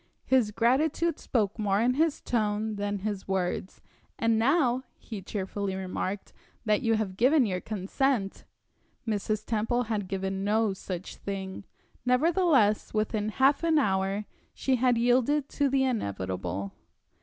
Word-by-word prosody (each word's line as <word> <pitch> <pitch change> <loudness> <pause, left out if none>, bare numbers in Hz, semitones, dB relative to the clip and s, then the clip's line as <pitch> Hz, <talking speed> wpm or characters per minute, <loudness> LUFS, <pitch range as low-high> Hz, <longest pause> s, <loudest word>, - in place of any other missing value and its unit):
His 255 -5 +3
gratitude 285 +9 +1
spoke 215 -3 -1
more 200 -2 +1
in 240 +3 +3
his 315 +2 +1
tone 215 -2 -1
than 205 0 -1
his 205 -3 -3
words. 190 0 -2 0.4
"And 230 -1 +2
now," 260 0 +3 0.2
he 215 -4 -8
cheerfully 195 0 -3
remarked, 190 +1 -4 0.3
"that 215 +3 +2
you 225 -3 +2
have 200 -4 -2
given 260 +4 +4
your 185 -3 -2
consent 210 +2 -1 0.3
" - - -39
Mrs. 215 0 -1
Temple 230 +2 0
had 215 -4 -2
given 190 0 -2
no 210 0 +2
such 190 -1 -6
thing. 195 -1 -5 0.4
Nevertheless, 255 - +3
within 215 0 0
half 270 +7 +3
an 325 -1 +3
hour 195 -4 +1 0.3
she 265 -1 +1
had 245 -1 +3
yielded 255 +4 +2
to 285 -1 +1
the 265 0 +2
inevitable. 95 - -2
215 Hz, 140 wpm, -28 LUFS, 195-255 Hz, 0.4 s, given